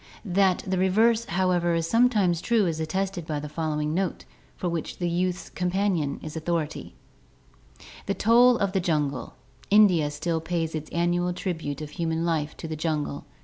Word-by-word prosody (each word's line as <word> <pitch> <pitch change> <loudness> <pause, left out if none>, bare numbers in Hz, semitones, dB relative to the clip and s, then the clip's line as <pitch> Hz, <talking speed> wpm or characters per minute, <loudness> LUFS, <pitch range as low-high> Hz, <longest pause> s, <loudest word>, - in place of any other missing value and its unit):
That 190 -1 +2
the 190 -1 -1
reverse, 220 +5 +3
however, 175 -2 +1
is 165 -1 0
sometimes 210 -7 +3
true 230 -4 +2
is 165 -2 -1
attested 185 +1 -2
by 150 -2 -2
the 150 - -6
following 150 0 -2
note, 185 0 -2 0.3
for 180 - -3
which 170 -2 -3
the 175 - -1
YouiKs 180 +1 -2
Com 180 0 -1
portion 180 -7 0
is 155 0 -7
authority: 160 -1 -3 1.1
"The 200 - 0
toll 240 +3 +5
of 200 -3 0
the 190 - +1
Jungle. 150 -5 -1 0.2
— 130 - -26
India 190 -8 +5
still 160 +3 -2
pays 165 -1 -2
its 155 -1 -5
annual 175 +1 0
tribute 160 -6 -4
of 150 -1 -7
human 165 -1 -2
life 155 -3 -1
to 165 - -6
the 160 - -4
jungle. 150 - -2
175 Hz, 175 wpm, -26 LUFS, 155-190 Hz, 1.1 s, toll